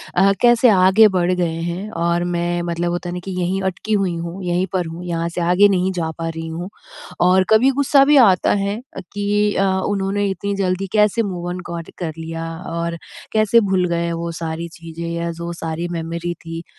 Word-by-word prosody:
अ, 195 +2 +5
कैसे 240 0 +5
आगे 190 +2 +6
बढ़ 175 +1 +2
गए 175 -2 0 0.2
हैं? 185 +5 -4
और 170 +1 0
मैं 175 0 -1
मतलब 170 +1 -1
होता 175 0 -3
है - - -4
ना 180 - -4
कि 190 - -4
यहीं 185 +2 -1
अटकी 215 +4 -5
हुई 190 -4 +1
हूँ 170 +3 -6
यहीं 180 +1 0
पर 180 -2 0
हूँ 165 +2 -7
यहाँ 170 -1 -2
से 170 +1 -4
आगे 200 +3 +6
नहीं 185 0 +1
जा 160 -1 -1
पा 165 0 -3
रही 165 0 -6
हूँ। 170 +4 -5 0.6
और 185 +1 +5
कभी 235 +5 +5
गुस्सा 275 0 +5
भी 295 0 +5
आता 185 -3 +3
है 200 +2 -2 0.2
अ, - - -3
कि 205 +2 -1
अ, 195 - +2 0.2
उन्होंने 200 0 0
इतनी 200 +1 -3
जल्दी 185 +1 -1
कैसे 210 +2 +3
मूव-ऑन 180 -2 -4
कॉट 170 -1 -6
कर 165 -3 -3
लिया 165 0 -5 0.2
और 170 0 -2 0.4
कैसे 215 +1 +4
भूल 185 -1 +2
गए 170 0 -1
वो 170 0 -3
सारी 165 +1 -3
चीज़ें 165 0 -7
या 170 0 -2
जो 170 +1 -6
सारी 165 +1 -4
मेमोरी 170 +1 -3
थी। 165 0 -8
175 Hz, 205 wpm, -20 LUFS, 170-195 Hz, 0.6 s, आगे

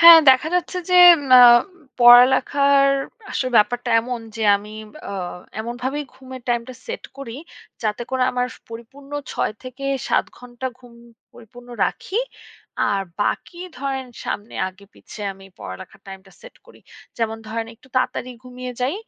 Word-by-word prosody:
হ্যাঁ, 335 0 +11
দেখা 260 +4 +3
যাচ্ছে 360 +1 -1
যে - - +3 0.3
ম 275 - -7
অ্যা 250 -1 +10 0.6
পড়ালেখার 265 +3 +6 0.4
আসলে 255 - -2
ব্যাপারটা 245 +3 +2
এমন 245 0 -5 0.2
যে 225 - -4
আমি 210 +1 -11 0.3
অ্যা 200 - -6 0.5
এমনভাবেই 250 +5 -4
ঘুমের 260 -1 -11
টাইমটা 240 +1 -2
সেট - - -6
করি 250 -4 -7 0.5
যাতে 215 +2 -2
করে 260 -1 0
আমার 250 0 0
স - - -22
পরিপূর্ণ 270 +5 -12 0.2
৬ - - -1
থেকে 255 +2 -9 0.2
৭ - - +2
ঘণ্টা 245 +1 -7
ঘুম 245 -2 -17 0.4
পরিপূর্ণ 240 +2 -15 0.2
রাখি। 430 +6 -3 0.7
আর 195 -1 0 0.2
বাকি 345 +10 -3 0.2
ধরেন 270 -1 -3 0.2
সামনে 205 +2 -5
আগে 190 +2 -17
পিছে - - -13
আমি 195 0 -16
পড়ালেখার 95 - -10
টাইমটা 190 0 -12
সেট - - -14
করি। - - -18 0.4
যেমন 225 -1 -1
ধরেন 225 0 -4
একটু 245 - -23
তাড়াতাড়ি 255 0 -1
ঘুমিয়ে 250 0 -8
যাই। 255 +6 0
250 Hz, 150 wpm, -21 LUFS, 225-265 Hz, 0.7 s, হ্যাঁ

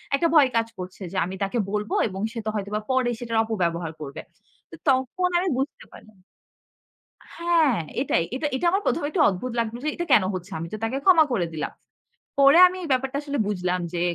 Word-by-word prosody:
একটা 335 +4 +2
ভয় 285 -4 +6
কাজ 230 0 +2
করছে 185 +2 -8
যে 190 - -5
আমি 185 +2 -6
তাকে 195 +5 -2
বলব 210 0 -2 0.2
এবং 190 -2 -6
সে 230 - -6
তো - - 0
হয়তোবা 210 +1 -3
পরে 260 -1 +2
সেটার 230 -2 -2
অপব্যবহার 170 -7 -2
করবে। 140 -2 -7 0.5
তো - - -9
তখন 265 +8 +1
আমি 370 - -1
বুঝতে 270 +3 -4
পারলাম 215 -2 -16 1.2
হ্যাঁ, 335 -7 +3 0.2
এটাই। 170 -11 +1
এটা 295 +3 -1
এটা 305 - -2
আমার 390 +2 +1
১ম 335 - +1
এ - - 0
একটু 325 +1 0
অদ্ভুত 205 +7 -4
লাগলো 230 0 -2
যে 305 - 0
এটা 345 - -3
কেন 210 - +6
হচ্ছে? 185 +2 -7
আমি 165 - -5
তো - - -3
তাকে 230 +4 -1
ক্ষমা 335 -5 +7
করে 195 -8 +1
দিলাম। 155 - -3 0.7
পরে 275 +3 +7
আমি 365 +1 -5
এই - - -5
ব্যাপারটা 265 +1 0
আসলে 285 -1 -3
বুঝলাম 180 -3 -1
যে, 170 - -2
230 Hz, 205 wpm, -24 LUFS, 190-285 Hz, 1.2 s, ক্ষমা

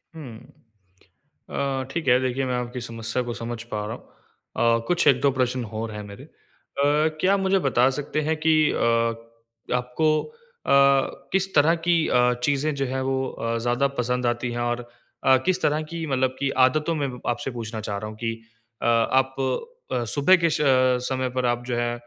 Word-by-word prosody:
हुँ। 130 -8 -9 1.1
अ, 135 -1 -2
ठीक 160 -1 -4
है, 125 0 +5
देखिए 130 +1 -1
मैं 125 -1 -1
आपकी 125 0 -4
समस्या 115 +1 -3
को 120 -1 -4
समझ 115 -1 -5
पा 105 -1 -2
रहा 115 - -4
हूँ। 115 0 -3
अ, 115 - -10
कुछ 175 -2 +1
1-2 140 0 +4
प्रश्न 130 -1 -1
और 110 +1 -5
है 105 0 -6
मेरे। 100 -1 -11
अ, - - -16 0.9
क्या 190 +2 +4
आप 200 - +2
मुझे 195 0 +2
बता 130 -5 +3
सकते 150 +1 -2
हैं 155 +1 0
कि 160 - +5 0.2
अ, 115 0 +1 0.6
आपको 125 +6 +1 0.5
अ, - - -1 0.6
किस 195 0 +1
तरह 155 +3 +5
की 175 - +5
अ, 125 0 +3
चीज़ें 145 +2 +1
जो 135 -1 -1
है 130 +1 -2
वो 135 0 -1
अ, 115 0 -3
ज्यादा 120 +3 +2
पसंद 125 +1 0
आती 120 +1 -1
हैं? 120 - -4
और 120 0 -2 0.6
किस 185 0 +1
तरह 150 +1 +1
की 165 +1 -5
मतलब 130 -2 0
की 140 -1 0 0.2
आदतों 155 +5 0
में 145 -2 -1 0.2
आपसे 120 +2 -2
पूछना 115 -2 -6
चाह 100 -1 -4
रहा 105 +2 -5
हूँ 110 - -10
कि 115 0 -2 0.5
अ, - - -3
आप 130 +3 +2 0.6
अ, 120 - 0
सुबह 145 +10 +4
के 165 - +4
स - - 0 0.5
समय 130 -1 -1
पर 125 - +1
आप 120 0 0
जो 125 - -1
है 120 0 0
125 Hz, 190 wpm, -24 LUFS, 120-140 Hz, 1.1 s, है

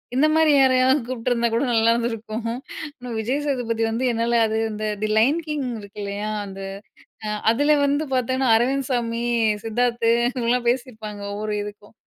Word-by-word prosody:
இந்த 295 +4 +4
மாதிரி 320 -1 +4
யாரையாவது 260 +1 +4
கூப்பிட்டுருந்தா 240 -1 0
கூட 235 - +1
நல்லாயிருந்துருக்கும் 230 -1 0
ஆனா, 250 +1 -8
விஜய்சேதுபதி 245 -2 -1
வந்து 230 +3 -2
என்னால 235 0 +1
அது 220 0 -1
இந்த 215 0 -5 0.2
தி - - +2
லயன் 275 +9 +4
கிங் 300 -3 -2
இருக்கு 205 0 -11
இல்லையா, 200 +1 -3 0.2
அந்த 195 0 -9 0.9
அதில 290 +5 +3
வந்து 285 +2 +1
பார்த்தீங்கன்னா, 260 0 +1
அரவிந்த் 265 +3 0
சாமி, 235 -1 -1 0.4
சித்தார்த்து 235 0 +1 0.2
இவங்கலாம் 240 -1 0
பேசியிருப்பாங்க. 220 -5 -4
ஒவ்வொரு 210 0 -3
இதுக்கும் 205 +1 -11
235 Hz, 140 wpm, -23 LUFS, 225-260 Hz, 0.9 s, இந்த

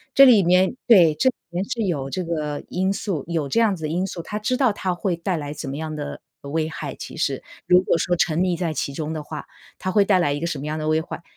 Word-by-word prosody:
这 275 - +9
里 230 -7 +7
面 180 +4 +3
对， 175 -10 +6
这 260 - +3
里 255 - -6
面 175 +3 -2
是 235 +1 -3
有 140 -7 -1
这 185 +7 -3
个 155 -3 -3
因 190 +2 0
素 190 -8 -3
有 160 -5 -2
这 230 - +2
样 220 -4 +3
子 160 -3 -6
的 - - 0
因 180 +4 0
素， 175 -3 -5
他 210 - -5
知 215 +4 0
道 255 -3 +3
它 190 -2 -2
会 180 0 -1
带 170 +1 -2
来 145 -2 -5
什 150 -1 -6
么 135 - -4
样 155 -1 -4
的 145 -1 -6 0.2
危 155 +3 -2
害， - - -5
其 - - -9
实。 - - -1 0.2
如 180 0 +6
果 180 - +1
说 175 +1 +1
沉 165 -1 +1
溺 180 -1 +1
在 170 -1 -2
其 140 - -2
中 155 +2 -4
的 155 -1 -4
话， 155 +1 -7 0.3
它 185 - -3
会 200 +1 +4
带 195 -2 +4
来 145 -5 +2
一 145 - -1
个 170 - -2
什 155 -5 -3
么 150 - -5
样 155 +1 -2
的 155 - -3
危害， 160 +2 -1
170 Hz, 300 characters per minute, -23 LUFS, 155-190 Hz, 0.3 s, 这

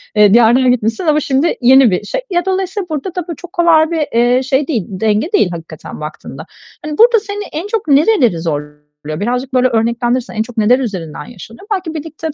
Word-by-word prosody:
eee, 210 -1 +5
diyardan 240 +2 +5
gitmişsin 225 - -1
ama 305 0 +3
şimdi 285 +3 0
yeni 255 -1 +6
bir 180 +3 -1
şey. - - -3
Ya, 350 -1 -1
dolayısıyla 380 0 -2
burada 315 +4 -4
da 360 -3 -4
bu 335 - -5
çok 355 +4 -13
kolay 330 -2 +3
bir, 315 -3 -1
eee, 245 +2 +3
şey 265 +2 0
değil, 240 - -1
denge 215 - -1
değil 195 - +2
hakikaten 165 -2 -9
baktığında. 150 0 -8 0.4
Hani, 300 -1 -5
burada 470 0 +5
seni 410 0 -6
en 335 +7 -4
çok 425 -5 -3
nereleri 280 - +3
zorluyor? 150 -2 -4 0.4
Birazcık 250 +5 -3
böyle 255 0 +3
örneklendirirsen 235 +2 -1
en 215 - 0
çok 235 +1 -13
neler 225 +4 +3
üzerinden 185 - -5
yaşanıyor? 230 - -13
Belki 365 -4 -4
birlikte 315 0 -6
260 Hz, 195 wpm, -15 LUFS, 220-330 Hz, 0.4 s, yeni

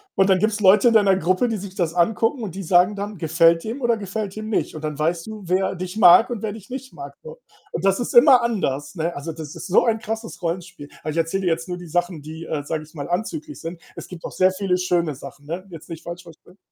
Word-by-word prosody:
und 195 0 +3
dann 185 -1 +4
gibt's 215 +1 +1
Leute 205 +4 +6
in - - +1
deiner 200 -3 +5
Gruppe, 185 +6 +1
die 230 - -1
sich 195 -1 -8
das 170 -3 -1
angucken 225 +7 +1
und 190 -5 -5
die 195 - -5
sagen 180 +4 +4
dann, 205 0 -5
gefällt 165 +1 +3
dem 235 +5 -5
oder 235 -1 +2
gefällt 200 0 -4
dem 215 0 -6
nicht 215 - -1
und 155 - -8
dann 150 -1 -4
weißt 165 +3 0
du, 215 -2 -8
wer 190 +2 +1
dich 185 +2 -6
mag 195 +3 +7
und 235 -4 -4
wer 210 - -1
dich 210 -3 -12
nicht 260 +1 -7
mag, - - -9
so. 475 +1 -10 0.3
Und - - -3
das 195 0 +3
ist - - -3
immer 255 0 +8
anders, 185 - -2
ne? 165 +1 -2
Also, 150 +3 -5
das 155 -2 -8
ist - - -7
so 185 - +4
ein 225 -2 +1
krasses 225 +1 -6
Rollenspiel. 175 -3 -5
Ah, 155 - -3
ich 155 - -4
erzähle 165 +4 0
dir 180 - +2
jetzt 165 +2 -2
nur 180 - -3
die 175 -1 -10
Sachen, 175 -1 -1
die 160 +3 -8
äh, 150 -2 -3
sage 155 0 -3
ich 155 - -18
mal, 145 -2 -5
anzüglich 300 - -3
sind. 165 +1 -6 0.2
Es - - -8
gibt 175 -2 -9
auch - - -6
sehr 185 0 +4
viele 185 -1 0
schöne 175 -5 0
Sachen, 140 +1 -11
ne? 175 +5 -5
Jetzt 165 -4 -11
nicht 165 -1 -8
falsch 175 +1 -7
verstehen. 175 +3 -17
185 Hz, 265 wpm, -22 LUFS, 165-215 Hz, 0.3 s, immer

